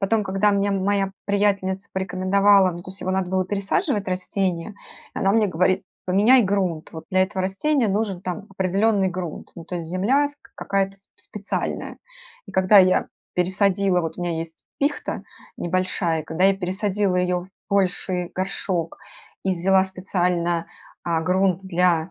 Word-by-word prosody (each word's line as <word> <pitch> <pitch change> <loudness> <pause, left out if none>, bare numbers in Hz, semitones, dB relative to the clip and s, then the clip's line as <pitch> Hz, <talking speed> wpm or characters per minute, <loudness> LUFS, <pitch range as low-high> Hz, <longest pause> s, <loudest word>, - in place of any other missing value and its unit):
Потом, 210 +1 +1
когда 195 +2 +2
мне 200 0 +1
моя 195 0 +1 0.2
приятельница 200 -1 0
порекомендовала 190 +1 +3
Ну, 175 0 -8
то 185 - -9
есть 190 - -8
его 185 - -2
надо 190 -1 0
было 185 0 +1
пересаживать- 205 - -1
растение. 185 0 -2 0.4
И - - -4
она 195 - +2
мне 215 -1 +4
говорит: 185 +2 +1 0.2
"Поменяй 215 +7 +5
грунт". 185 -5 -1
Вот 160 - -8
для 185 0 +4
этого 190 0 -2
растения 235 +7 +1
нужен 200 -2 -1
там 195 +3 -5
определенный 195 +2 +1
грунт, 175 -3 -6
ну, 170 - -8
то 180 - -7
есть 170 -2 -4
земля 220 - +2
с 290 0 -10
к - - -23
какая-то 195 0 -1
сп 195 - -17
специальная. 205 -1 -4 0.5
И - - -11
когда 190 +2 +6
я 185 -1 +4 0.3
пересадила 190 0 +2
Вот 165 -1 -4
у - - -4
меня 170 -2 -1
есть 165 0 -7
пихта 285 +1 -1 0.4
небольшая, 175 -2 0
когда 160 +4 -1
я 195 0 +5
пересадила 195 +1 0
ее 180 0 +1
в 185 - -14 0.2
больший 185 -2 0
горшок 185 -3 -2 0.5
и 190 - +1
взяла 190 +2 +3
специально, 180 -2 -1 0.4
а, 165 -2 0
грунт 185 +2 +1
для 180 -2 +1
190 Hz, 165 wpm, -23 LUFS, 180-200 Hz, 0.5 s, когда